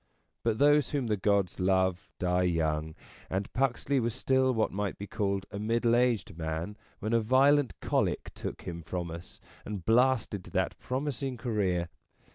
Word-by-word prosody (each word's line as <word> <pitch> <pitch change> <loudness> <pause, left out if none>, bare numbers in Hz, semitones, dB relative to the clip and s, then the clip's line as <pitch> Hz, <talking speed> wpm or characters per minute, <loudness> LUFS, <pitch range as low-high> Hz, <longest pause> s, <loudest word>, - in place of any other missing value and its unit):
But 115 -2 +1
those 145 0 +4
whom 140 -4 -1
the 110 -2 +1
gods 100 -2 +1
love 95 0 +1
die 90 0 +1
young; 80 -3 0 0.3
and 95 +1 -3
Puxley 135 +1 +1
was 115 -2 -1
still 130 0 +2
what 110 -3 +1
might 100 0 -2
be 100 - -6
called 100 -1 -1
a 100 - -5
middle 115 +2 +2
aged 120 -8 +1
man 80 +5 -3 0.2
when 110 +3 -3
a 115 - +5
violent 135 +4 +3
colic - - 0
took - - -6
him 85 -1 -5
from 85 +1 -4
us 85 +1 -9 0.2
and 100 -5 -6
blasted 115 -4 +2
that - - -1
pro 130 +1 -2
mising 135 -3 -3
career. 95 -8 0
105 Hz, 165 wpm, -30 LUFS, 90-125 Hz, 0.3 s, a